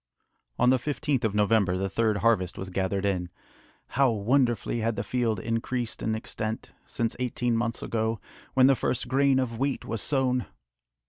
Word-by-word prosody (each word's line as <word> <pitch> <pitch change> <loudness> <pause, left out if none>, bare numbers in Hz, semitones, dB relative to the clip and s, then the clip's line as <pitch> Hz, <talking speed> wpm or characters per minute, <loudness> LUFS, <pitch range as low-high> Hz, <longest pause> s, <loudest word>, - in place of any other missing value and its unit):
On 125 +1 +4
the 130 - +3
15th 145 0 -1
of 105 -2 0
November, 105 -3 +3
the 95 +1 -1
third 110 +1 +1
harvest 95 -6 +2
was 95 0 -6
gathered 95 +1 -1
in. 90 -3 -1 0.6
How 135 0 +3
wonderfully 120 +1 +1
had 115 0 0
the - - -2
field 115 -5 0
increased 115 +2 -2
in 110 - 0
extent, 110 0 -4 0.2
since 115 -1 -2
eighteen 125 -1 0
months 115 0 -1
ago, 110 -1 -1 0.4
when 130 -1 +6
the 135 0 +6
first 125 0 -1
grain 135 +1 +3
of 120 -3 -1
wheat 140 0 -1
was 110 -2 -3
sown! 130 -3 +1
115 Hz, 170 wpm, -27 LUFS, 105-125 Hz, 0.6 s, when